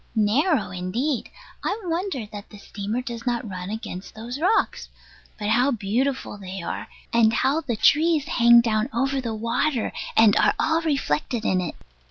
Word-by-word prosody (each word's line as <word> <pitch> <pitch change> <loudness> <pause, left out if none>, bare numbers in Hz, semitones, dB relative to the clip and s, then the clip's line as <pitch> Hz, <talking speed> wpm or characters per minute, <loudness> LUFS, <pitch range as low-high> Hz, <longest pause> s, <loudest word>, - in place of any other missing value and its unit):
Narrow 225 - +2
indeed. 220 +10 -2 0.3
I 430 - -1
wonder 340 - -2
that 205 0 -8
the 210 - -12
steamer 205 +4 -4
does 235 0 -6
not 240 -1 -1
run 185 -1 -6
against 215 -4 -7
those 235 +5 -6
rocks. 375 +7 +1 0.5
But 210 -1 -3
how 245 +5 +3
beautiful 240 +1 -1
they 190 -1 -7
are, - - -4 0.3
and 230 -1 +5
how 270 +7 +1
the 245 -7 -2
trees 310 +6 +3
hang 235 0 +6
down 220 +1 0
over 270 +2 0
the 230 -3 -3
water, 230 +4 -1 0.2
and 220 -1 +6
are - - +3
all 320 +1 +1
reflected 245 - -1
in 185 -1 +2
it! 175 - -4
235 Hz, 165 wpm, -24 LUFS, 210-275 Hz, 0.5 s, hang